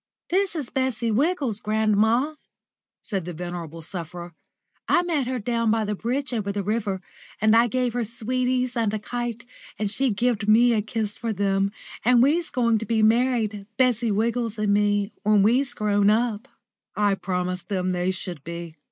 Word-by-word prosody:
"This 385 0 +1
is 290 -6 -4
Bessie 245 -3 0
Wiggles, 270 - +1
grandma," 220 +6 +2 0.7
said 195 -5 -3
the 175 -1 -6
venerable 170 -1 -6
sufferer; 175 0 -7 0.5
"I 350 - +3
met 310 -7 0
her 255 0 -1
down 230 0 0
by 220 0 +2
the 210 - -1
bridge 250 +6 -2
over 205 -4 -1
the 200 0 -3
river, 205 -2 -2 0.4
and 220 +1 +4
I 230 +1 +5
gave 250 0 0
her 245 -1 0
sweeties 250 +3 -1
and 225 -3 +1
a - - 0
kite, 235 +1 -4 0.3
and 205 -1 -1
she 265 +4 +1
gived 220 0 0
me 235 +3 +6
a 215 - +2
kiss 215 -1 -3
for 230 -2 -3
them, 195 -1 +1 0.3
and 245 +1 +5
we's 320 +5 +2
going 235 -4 +2
to 225 - -4
be 220 -1 +2
married, 220 -3 +2
Bessie 240 -3 +2
Wiggles 230 +2 0
and 210 -1 +1
me, 205 0 +2
when 210 -2 +4
we's 245 +4 +2
grown 205 -1 +2
up." 220 0 +1 0.5
I 205 -1 +2
promised 180 -2 -3
them 185 -2 0
they 180 0 0
should 180 -5 -5
be. 170 0 -7
220 Hz, 175 wpm, -24 LUFS, 200-245 Hz, 0.7 s, me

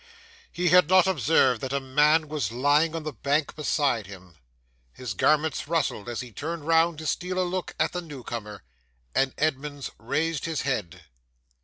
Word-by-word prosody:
'He 175 0 0
had 180 -1 +6
not 185 -1 +6
observed 140 - +3
that 130 - -4
a 140 - 0
man 150 +4 +3
was 150 -5 -2
lying 145 +6 +2
on 165 - -4
the 155 -1 -5
bank 140 +5 -1
beside 140 - 0
him; 95 -3 -12 0.6
his 125 - -6
garments 155 +7 +1
rustled 150 -9 -1
as 120 - -3
he 125 -1 -9
turned 160 +5 -5
round 165 0 +3
to 155 - -7
steal 180 +4 -2
a 185 - +2
look 185 0 -4
at 155 - +2
the 180 - -4
new 145 -7 -10
comer; 105 -4 -7 0.5
and 135 0 +2
Edmunds 145 -2 -2
raised 155 +6 -1
his 160 -3 -2
head. 115 - -3
150 Hz, 175 wpm, -26 LUFS, 130-165 Hz, 0.6 s, had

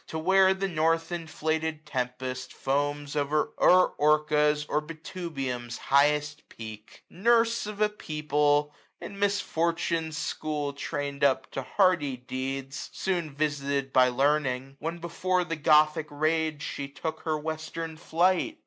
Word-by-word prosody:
To 160 - -5
where 190 +3 +4
the 195 +1 -1
north 165 -1 +1
inflated 160 -2 -2
tempest 130 -1 -4
foams 145 +1 -1
89Q 150 +1 0
O'er 180 0 +7
Orca*& 150 0 +3
or 150 - 0
Betubium's 150 - -5
highest 150 +2 +1
peak:, 110 -1 -10
Nurse 230 +3 +2
of 210 -1 -7
a 210 - +5
people, 150 -5 0 0.3
in 200 -1 -8
misfortune's 170 -5 0
school 150 -1 -3
Train'd 140 0 -4
up 130 -1 +2
to 135 - -3
hardy 150 -3 +2
deeds; 135 +2 -5
soon 175 -4 -2
visited 140 -2 -1
By 130 0 +6
Learning, 135 0 0
when 165 +3 -3
before 180 +2 -1
the 165 -1 -3
Gothic 155 0 +4
rage 155 0 0
She 140 - -4
took 155 +3 -5
her 155 -2 -1
western 160 +1 -5
flight. 180 - +1
150 Hz, 130 wpm, -28 LUFS, 140-165 Hz, 0.3 s, O'er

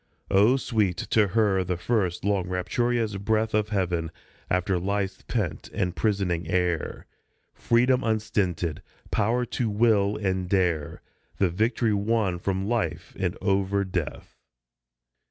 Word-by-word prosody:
Oh, 105 +7 +5
sweet 105 -8 0
to 105 -2 +2
her 100 -2 +2
the 90 0 -2
first, 95 -2 -1
long, 100 -3 +1
rapturous 110 +3 0
breath 110 +2 0
Of 105 0 +1
Heaven, 90 -5 -1 0.4
after 90 0 +1
life's 95 0 -2
pent 105 -9 -2
and 90 -1 -1
prisoning 95 -4 0
air; 90 -3 -1 0.5
Freedom 125 +2 +2
unstinted, 95 -7 -1 0.3
power 120 +4 +1
to 120 -1 -2
will 105 -2 +2
and 95 -3 -1
dare 90 -6 0 0.3
The 95 -3 +2
victory 110 +4 +1
won 100 -3 0
from 95 +1 -1
Life 120 +1 -2
and - - -1
over 100 0 +1
Death. 90 -4 -5
100 Hz, 125 wpm, -26 LUFS, 90-110 Hz, 0.5 s, Oh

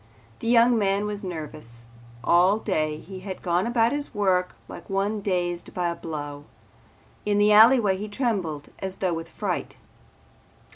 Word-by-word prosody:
The - - -5
young 235 0 +5
man 200 0 +1
was 205 0 -4
nervous. 150 -9 -7 0.4
All 180 +4 +4
day 155 -8 -1
he 190 +4 -10
had 190 0 -7
gone 175 +3 +1
about 235 -1 +2
his 290 0 -3
work 185 -3 +1
like - - -11
one 200 +2 -1
dazed 175 -3 -2
by 175 -1 0
a 170 - -3
blow. 145 -3 -6 0.8
In 205 -1 +1
the 205 +1 +4
alleyway 215 -2 +6
he 210 +2 -6
trembled 195 - -2
as 190 0 -4
though 185 -3 -1
with 165 0 -5
fright. - - -3
190 Hz, 155 wpm, -25 LUFS, 170-210 Hz, 0.8 s, alleyway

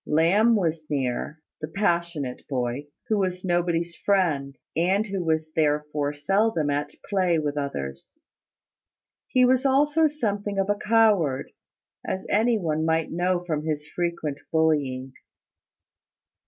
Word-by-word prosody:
Lamb 190 +10 +4
was 165 -5 -1
near, 140 +3 -2 0.2
the 155 - -3
passionate 170 -7 -1
boy, 130 +1 -2 0.2
who 215 -2 +1
was 185 -1 -2
nobody's 170 -1 0
friend, 155 -9 0 0.2
and 190 +6 +2
who 195 -3 -3
was 160 -1 0
therefore 150 -1 +1
seldom 160 +1 +1
at 145 +1 -1 0.2
play 185 -4 +2
with 150 -2 -1
others. 70 - -5 1.1
He 255 -1 +4
was 255 0 +3
also 295 +4 +3
something 205 -8 -2
of 195 +1 +1
a - - +1
coward, 205 -11 +2 0.5
as 190 - -3
any 225 +3 +3
one 160 -5 -1
might 160 0 0
know 180 +1 0
from 155 -3 -2
his 155 -1 -3
frequent 170 -5 -3
bullying. 140 -5 +1
165 Hz, 125 wpm, -25 LUFS, 150-200 Hz, 1.1 s, Lamb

